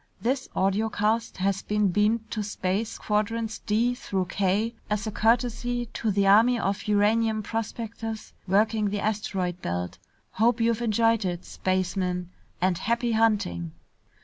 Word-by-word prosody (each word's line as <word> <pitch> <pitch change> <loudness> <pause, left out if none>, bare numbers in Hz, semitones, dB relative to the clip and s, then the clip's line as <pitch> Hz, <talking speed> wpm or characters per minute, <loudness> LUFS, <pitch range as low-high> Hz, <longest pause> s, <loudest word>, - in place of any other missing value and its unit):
"This 260 +3 -1
audiocast 215 +3 0
has 195 +1 0
been 210 -1 +1
beamed 215 +4 +1
to 215 - -2
space 205 +2 -2
quadrants 220 +1 -1
D 230 +3 +1
through 195 -7 -2
K, 200 +4 +1 0.2
as 210 -1 -1
a 215 - -2
courtesy 240 +2 +1
to 225 - -1
the 200 -1 +2
army 225 +5 +6
of 200 -2 -2
uranium 215 +1 +2
prospectors 225 0 -5
working 210 +2 +2
the 205 +1 -2
asteroid 195 -4 -2
belt. 90 +1 -3 0.3
Hope 230 +3 +2
you've 230 0 +1
enjoyed 225 -1 +2
it, 175 -2 -3
spacemen, 185 -1 -1 0.3
and 185 -1 +1
happy 235 +3 0
hunting!" 205 - +1
210 Hz, 135 wpm, -26 LUFS, 195-225 Hz, 0.3 s, army